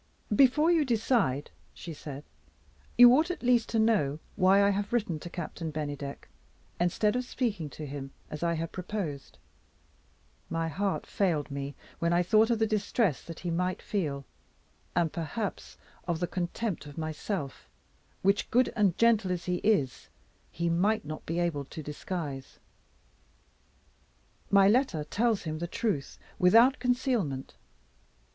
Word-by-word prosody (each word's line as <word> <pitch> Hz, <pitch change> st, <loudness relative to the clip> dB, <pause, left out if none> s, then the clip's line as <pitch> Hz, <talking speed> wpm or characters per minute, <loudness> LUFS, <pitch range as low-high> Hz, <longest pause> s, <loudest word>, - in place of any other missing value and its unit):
"Before 290 Hz, +7 st, +5 dB
you 330 Hz, -3 st, +4 dB
decide," 225 Hz, -, +1 dB, 0.2 s
she 170 Hz, -, -7 dB
said, 145 Hz, -1 st, -8 dB, 0.7 s
"you 245 Hz, 0 st, +10 dB
ought 315 Hz, +5 st, +2 dB
at 360 Hz, -, -4 dB
least 240 Hz, -2 st, +3 dB
to 230 Hz, -, 0 dB
know 210 Hz, -11 st, +2 dB, 0.2 s
why 195 Hz, +1 st, +5 dB
I 200 Hz, -, +4 dB
have 200 Hz, +1 st, -2 dB
written 210 Hz, -10 st, 0 dB
to 175 Hz, -, -8 dB
Captain 165 Hz, -1 st, -5 dB
Bennydeck, 145 Hz, -2 st, -5 dB, 0.5 s
instead 195 Hz, +5 st, +1 dB
of 250 Hz, -, 0 dB
speaking 220 Hz, -, -2 dB
to 155 Hz, -, -8 dB
him 140 Hz, -1 st, -6 dB, 0.2 s
as 150 Hz, -, -6 dB
I 170 Hz, 0 st, +1 dB
had 165 Hz, 0 st, -3 dB
proposed. 180 Hz, -7 st, -5 dB, 1.1 s
My 165 Hz, 0 st, -1 dB
heart 195 Hz, +5 st, -1 dB
failed 155 Hz, -7 st, 0 dB
me 140 Hz, 0 st, -5 dB, 0.2 s
when 170 Hz, 0 st, +1 dB
I 175 Hz, +1 st, +3 dB
thought 220 Hz, +5 st, +4 dB
of 235 Hz, -, +2 dB
the 220 Hz, -, +2 dB
distress 210 Hz, -, 0 dB
that 165 Hz, -, -9 dB
he 175 Hz, -, -2 dB
might 180 Hz, +2 st, -1 dB
feel 150 Hz, -, -3 dB, 0.7 s
and, 170 Hz, -2 st, +1 dB
perhaps 180 Hz, +5 st, -4 dB, 0.3 s
of 170 Hz, -2 st, -1 dB
the 175 Hz, -, 0 dB
contempt 180 Hz, +1 st, -3 dB
of 145 Hz, -, -11 dB
myself 155 Hz, -1 st, -4 dB, 0.5 s
which, 195 Hz, +1 st, +2 dB
good 250 Hz, +1 st, +3 dB
and 200 Hz, -5 st, +2 dB
gentle 225 Hz, -5 st, +3 dB
as 180 Hz, -1 st, -3 dB
he 180 Hz, -1 st, 0 dB
is, 150 Hz, -, 0 dB, 0.4 s
he 170 Hz, +1 st, -2 dB
might 185 Hz, +4 st, +1 dB
not 155 Hz, +1 st, -7 dB
be 165 Hz, -, -2 dB
able 170 Hz, -5 st, -1 dB
to 155 Hz, +3 st, -8 dB
disguise. 145 Hz, -2 st, -5 dB, 1.9 s
My 200 Hz, -1 st, +6 dB
letter 210 Hz, -, +2 dB
tells 220 Hz, +7 st, 0 dB
him 155 Hz, -2 st, -4 dB
the 170 Hz, -, -3 dB
truth, 190 Hz, -, -2 dB, 0.2 s
without 230 Hz, +9 st, +6 dB
concealment. 245 Hz, -, -1 dB
180 Hz, 150 wpm, -29 LUFS, 155-220 Hz, 1.9 s, you